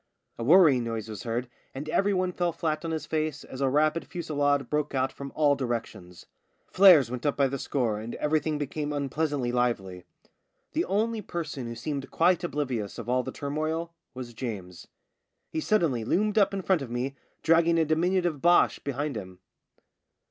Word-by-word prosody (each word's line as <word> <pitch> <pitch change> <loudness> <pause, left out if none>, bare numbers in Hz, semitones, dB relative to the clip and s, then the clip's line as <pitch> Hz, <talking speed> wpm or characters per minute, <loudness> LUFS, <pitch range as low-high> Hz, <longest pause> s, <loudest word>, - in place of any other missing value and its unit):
A - - -2
worrying 150 -3 +6
noise 115 -2 -4
was 110 -3 -7
heard, 120 +2 -3 0.3
and 140 +3 -5
every 195 +6 +2
one 185 -1 0
fell 175 -1 0
flat 155 -2 -2
on 165 - -3
his 160 -1 -3
face 155 -2 -2
as 130 - -8
a 135 - +3
rapid 155 +4 +1
fusillade 145 -5 0
broke 150 -1 -1
out 130 0 +1
from 140 -1 -8
all 150 -2 +4
directions. 115 -9 -5 0.5
Flares 175 - +7
went 125 -1 -5
up 145 - 0
by 140 - +4
the 135 +1 -4
score 120 -7 -1
and 110 +2 -6
everything 150 0 0
became 145 +1 -3
unpleasantly 145 -2 -1
lively. 100 -7 -1 0.7
The - - +1
only 220 +3 0
person 155 - -5
who 115 - -6
seemed 140 +3 -4
quite 175 +1 +2
oblivious 130 - -3
of 115 0 -6
all 125 +1 +2
the 130 - -6
turmoil 155 +4 -3 0.2
was 125 -2 -7
James. 100 -7 -6 0.6
He 160 - -2
suddenly 160 - +1
loomed 210 - +1
up 200 - +4
in 195 -1 -4
front 185 -4 +2
of 135 - -6
me 125 +3 -3 0.3
dragging 165 +1 +4
a 165 - +3
diminutive 170 -1 +1
Boche 175 0 +4
behind 140 0 -3
him. 95 -4 -7
145 Hz, 175 wpm, -27 LUFS, 125-165 Hz, 0.7 s, Flares